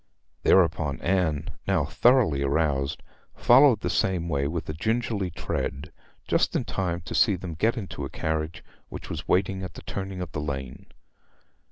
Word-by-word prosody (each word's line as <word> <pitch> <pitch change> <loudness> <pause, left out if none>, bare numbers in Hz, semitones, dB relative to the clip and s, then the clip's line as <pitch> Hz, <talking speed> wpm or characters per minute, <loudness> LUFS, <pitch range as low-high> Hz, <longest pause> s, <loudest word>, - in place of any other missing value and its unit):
Thereupon 80 -6 +3
Anne, 85 -4 0 0.2
now 95 -7 +2
thoroughly 115 - +3
aroused, 70 -1 0 0.3
followed 125 -3 +6
the - - -1
same 90 -3 0
way 70 -3 0
with 80 +2 -4
a 75 - -3
gingerly 110 +2 -1
tread, 80 -1 -4 0.4
just - - +1
in - - +1
time 90 -3 -2
to 85 - -8
see 105 -4 +4
them 90 -2 -6
get 110 +10 +1
into 100 -5 -5
a - - -4
carriage 80 +3 -3 0.3
which - - -8
was - - -3
in - - -9
waiting 95 +1 +1
at 95 - -7
the - - -10
turning 95 -1 -5
of 90 -1 -5
the 75 - -3
lane. 65 -3 -5
85 Hz, 170 wpm, -26 LUFS, 75-95 Hz, 0.4 s, followed